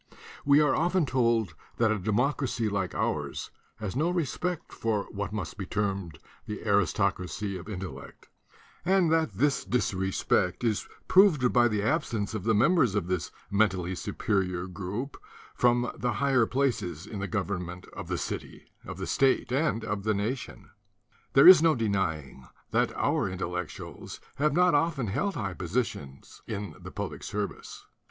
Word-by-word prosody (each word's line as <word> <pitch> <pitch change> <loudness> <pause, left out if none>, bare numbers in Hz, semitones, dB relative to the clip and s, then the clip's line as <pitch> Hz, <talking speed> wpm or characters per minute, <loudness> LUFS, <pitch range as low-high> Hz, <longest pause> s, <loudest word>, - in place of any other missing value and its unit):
We 140 +1 +5
are 145 -3 +3
often 175 +1 +2
told 115 -7 +1 0.2
that 115 -2 +3
a 110 - 0
democracy 120 +3 0
like 100 -3 -2
ours - - -2 0.2
has 105 -1 -5
no 155 +6 +1
re 175 -3 +1
spect 180 +4 -4
for 110 -3 -1
what 100 0 -4
must 105 -4 -5
be 95 - -4
termed 100 -7 -2 0.3
the 105 0 -6
aristocracy 100 0 0
of 90 +3 -8
intellect 95 -3 -8 0.6
and 180 -1 +3
that 160 -8 +2
this 135 +8 +1
disrespect 95 -4 0
is 110 -3 0 0.2
proved 170 -10 +5
by 120 -1 +5
the 105 -3 -1
uh 110 - +3
i - - +3
nce 105 -3 -4
of 110 -4 -4
the 110 -1 +3
members 125 - +4
of 105 - 0
this 90 -3 -2 0.2
mentally 95 -3 +1
superior 90 0 -1
group 100 +8 -5 0.4
from 120 0 +2
the 120 -1 -1
higher 130 -1 +2
places 105 - -1
in 105 -1 -6
the 100 - -2
government 95 -4 -3
of - - -7
the - - -1
city, - - -5 0.2
of - - -7
the - - -4
state 135 -2 +2
and 130 -4 0
of 105 -1 -2
the 110 +1 0
nation. 115 +6 -4 0.6
There 135 - +8
is 185 -4 +11
no 160 -1 +4
denying 85 - -2 0.2
that - - +2
our - - +1
Intellectuals 90 -2 -5 0.2
have 150 0 +2
not 180 +2 +4
of 165 +2 +2
ten 135 -4 -2
held 190 - -1
high 100 -7 -3
position 85 - -3 0.3
in 100 -5 -4
the - - -8
public - - -5
service. 105 0 -5
110 Hz, 160 wpm, -28 LUFS, 95-135 Hz, 0.6 s, is